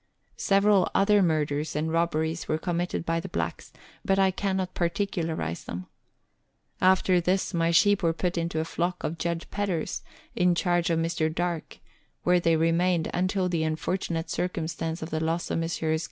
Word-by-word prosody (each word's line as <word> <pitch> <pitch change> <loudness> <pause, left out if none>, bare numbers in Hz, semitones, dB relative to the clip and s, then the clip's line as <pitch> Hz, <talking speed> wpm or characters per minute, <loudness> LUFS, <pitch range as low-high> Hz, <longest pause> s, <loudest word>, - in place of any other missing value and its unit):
Several 200 -1 +3
other 205 +1 +4
murders 155 -3 0
and 155 +2 -1
robberies 165 -1 0
were 155 - +1
committed 175 0 -2
by 165 0 0
the - - -6
blacks, - - -4 0.3
but 195 - +2
I 190 -1 +4
cannot 190 -1 -2
particu 175 +1 -1
larize 160 - -3
them. 90 +1 -6 1.0
After 185 -1 +4
this, 185 +3 0
my 165 -1 +2
sheep 200 +4 +4
were 165 -2 +3
put 175 +2 -2
into 170 -1 -1
a 160 - -1
flock 175 +2 -2
of 165 +2 -3
Judge 170 -1 -2
Pedder's, 195 -6 -2 0.3
in 180 0 +3
charge 175 0 +1
of 165 - +2
Mr. 165 -1 0
Darke, 170 0 -3 0.5
where 180 0 +4
they 165 -1 +3
remained 165 +1 +2
until 185 +1 +1
the 170 -3 0
unfortunate 165 +1 -2
circumstance 165 -2 -2
of 160 - -7
the 160 0 -1
loss 165 +2 -1
of - - 0
Messrs. 160 -1 -1
170 Hz, 170 wpm, -27 LUFS, 160-180 Hz, 1.0 s, other